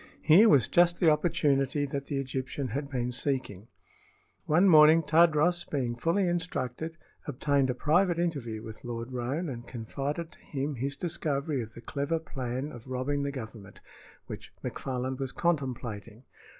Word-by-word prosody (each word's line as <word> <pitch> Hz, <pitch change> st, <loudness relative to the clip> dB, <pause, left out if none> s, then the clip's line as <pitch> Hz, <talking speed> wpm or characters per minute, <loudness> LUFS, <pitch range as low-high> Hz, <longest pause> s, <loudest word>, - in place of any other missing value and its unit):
Here 190 Hz, +8 st, +7 dB
was 140 Hz, -5 st, +5 dB
just 175 Hz, 0 st, +3 dB
the 165 Hz, -3 st, +5 dB
opportunity 145 Hz, -3 st, +1 dB
that 140 Hz, 0 st, -4 dB
the 140 Hz, -, -3 dB
Egyptian 130 Hz, 0 st, -3 dB
had 140 Hz, +4 st, -3 dB
been 125 Hz, -3 st, -2 dB
seeking. 125 Hz, -6 st, -2 dB, 0.8 s
One 175 Hz, +6 st, +4 dB
morning 155 Hz, -1 st, +7 dB
Tadros, 165 Hz, +2 st, +3 dB
being 125 Hz, -5 st, -1 dB
fully 170 Hz, +9 st, +1 dB
instructed, 165 Hz, -3 st, -3 dB, 0.3 s
obtained 140 Hz, -1 st, +1 dB
a 125 Hz, -, 0 dB
private 170 Hz, +6 st, +2 dB
interview 135 Hz, -11 st, -2 dB
with 110 Hz, -1 st, -9 dB
Lord 120 Hz, 0 st, -5 dB
Roane 130 Hz, +8 st, -2 dB
and 120 Hz, -4 st, -7 dB
confided 140 Hz, +8 st, -4 dB
to -, -, -17 dB
him 145 Hz, 0 st, -3 dB
his 140 Hz, +4 st, -3 dB
discovery 150 Hz, -3 st, -2 dB
of 110 Hz, -1 st, -9 dB
the 115 Hz, -, -9 dB
clever 140 Hz, +6 st, -2 dB
plan 135 Hz, -2 st, -4 dB
of 120 Hz, -1 st, -11 dB
robbing 130 Hz, +3 st, -1 dB
the 140 Hz, 0 st, -2 dB
Government 110 Hz, -6 st, -9 dB, 0.5 s
which -, -, -9 dB
McFarland 130 Hz, 0 st, -3 dB
was 135 Hz, -1 st, -3 dB
contemplating. 125 Hz, -8 st, -3 dB
140 Hz, 150 wpm, -29 LUFS, 125-160 Hz, 0.8 s, Here